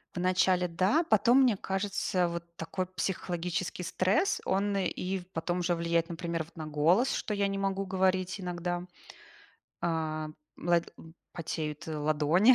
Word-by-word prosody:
В - - -2
начале 180 0 +3
да, 190 - +2
потом, 255 +2 +6
мне 240 -6 +4
кажется, 190 -2 0
вот 170 0 -4
такой 165 +3 -3
психологический 180 0 -2
стресс, 190 - +1
он, 200 +1 +1
и 190 0 -1
в 180 - -13
потом 175 +2 -1
уже 175 0 +1
влияет, 170 0 +1
например, 170 -1 -2
вот 165 - -19
на 155 -1 -6
голос, 165 - +3
что 215 - -2
я 200 -1 +1
не 195 - -2
могу 195 0 0
говорить 185 0 +1
иногда. 175 -1 -3 1.0
А, 155 -2 -1 0.3
лад 170 0 +1 0.4
потеют, 160 -1 -4
э, 155 - -3
ладони, 155 - +4
180 Hz, 150 wpm, -30 LUFS, 165-190 Hz, 1.0 s, потом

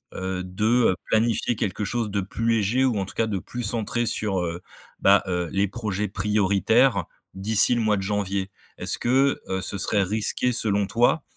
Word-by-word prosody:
heu, 95 0 -4
de, 95 +3 -3 0.3
heu, 90 - -2
planifier 115 +1 +1
quelque 105 -1 -3
chose 110 0 -2
de 100 -1 -1
plus 115 +4 -4
léger 115 +4 +1
ou 115 -6 0
en 95 - -2
tout - - -12
cas 115 - +1
de 100 -3 -2
plus 120 +8 -7
centré 115 +2 0
sur, 105 -4 -1
heu, 85 0 -4 0.4
bah, 100 +1 +4
heu, 90 -2 -2
les 100 +1 +1
projets 105 -1 -3
prioritaires 100 +2 +1 0.3
d'ici 105 +5 +4
le 120 - 0
mois 110 -2 +1
de - - -3
janvier. 100 -1 -2 0.3
Est-ce - - 0
que, 135 +3 +1
heu, 95 0 -2
ce 100 - 0
serait 100 +2 +2
risqué, 110 +5 0
selon 105 -4 +2
toi, 120 +7 +1
105 Hz, 190 wpm, -24 LUFS, 95-115 Hz, 0.4 s, bah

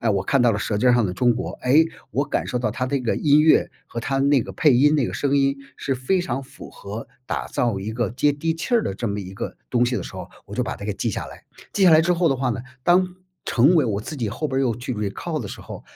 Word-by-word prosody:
哎， 115 - +1
我 95 -2 +1
看 130 +5 +2
到 120 -2 +4
了 100 - -1
舌 105 0 -2
尖 125 +4 +4
儿 - - +5
上 120 -4 +3
的 90 - -4
中 120 +3 +3
国， 125 - -4
诶， 150 +6 +5 0.2
我 140 - 0
感 - - -1
受 125 - -2
到 125 - -1
它 125 +1 -2
的 130 - -2
这 - - -7
个 115 - 0
音 150 -1 +4
乐 155 0 +4 0.2
和 115 - -7
它 135 +3 -1
那 140 -2 +3
个 - - -8
配 150 -5 +4
音 150 +4 +5
那 140 -5 +2
个 - - -5
声 140 0 0
音 140 0 +2 0.2
是 135 - -1
非 130 +9 0
常 135 -5 -3
符 135 - -12
合 110 +6 -8 0.2
打 - - -3
造 115 -6 -1
一 105 +3 -4
个 115 -2 -1
接 145 +4 +2
地 160 +3 -1
气 175 +10 -2
儿 230 - +4
的 95 - -3
这 115 +3 -3
么 100 0 -3
一 95 -1 -7
个 95 - -6
东 125 -1 +3
西 125 0 -1
的 - - -3
时 - - -9
候， - - -7 0.2
我 - - -10
就 - - 0
把 - - -4
它 - - -9
给 - - -1
记 - - -2
下 - - -3
来。 - - -12 0.3
记 200 - 0
下 175 - +7
来 160 0 +7
之 180 +2 +2
后 170 -1 +2
的 135 - +1
话 130 -1 0
呢， 120 - -3 0.2
当 180 +1 +3 0.3
成 140 +9 +5
为 160 - +5
我 100 -2 -1
自 140 +8 -6
己 120 -6 -2
后 155 +9 -3
边 135 -1 -1
又 120 -5 +1
去 125 +1 -4
recall 115 - -3
的 100 - -6
时 - - -8
候， - - -9
130 Hz, 340 characters per minute, -23 LUFS, 115-150 Hz, 0.3 s, 下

